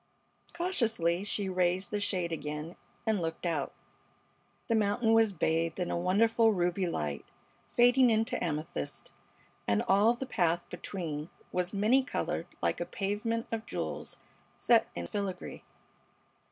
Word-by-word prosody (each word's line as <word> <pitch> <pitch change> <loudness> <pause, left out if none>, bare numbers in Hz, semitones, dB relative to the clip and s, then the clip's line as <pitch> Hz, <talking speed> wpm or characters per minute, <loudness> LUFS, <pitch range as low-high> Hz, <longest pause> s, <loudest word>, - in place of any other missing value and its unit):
Cautiously 225 - +1
she 205 -1 -1
raised 185 0 +1
the 210 - 0
shade 185 -4 0
again 150 +1 -4 0.3
and 220 -4 +1
looked 165 +1 -3
out. 160 -5 -1 1.0
The 230 - +1
mountain 220 +1 +2
was 225 -2 +5
bathed 165 0 0
in 180 - -1
a - - 0
wonderful 220 +6 +3
ruby 180 0 +1
light 75 - -2 0.5
fading 245 +1 +5
into 225 +3 +1
amethyst, 155 - -4 0.5
and 100 0 +2
all 210 +5 +4
the 265 - -4
path 175 -8 +1
between 160 -5 -5 0.2
was 180 0 -1
many 215 +7 +4
colored 270 - -2 0.2
like - - +1
a - - 0
pavement 210 +3 -2
of 225 -1 -3
jewels - - -4 0.4
set 230 -1 +4
in - - -3
filigree. 200 -4 -4
195 Hz, 135 wpm, -31 LUFS, 170-225 Hz, 1.0 s, was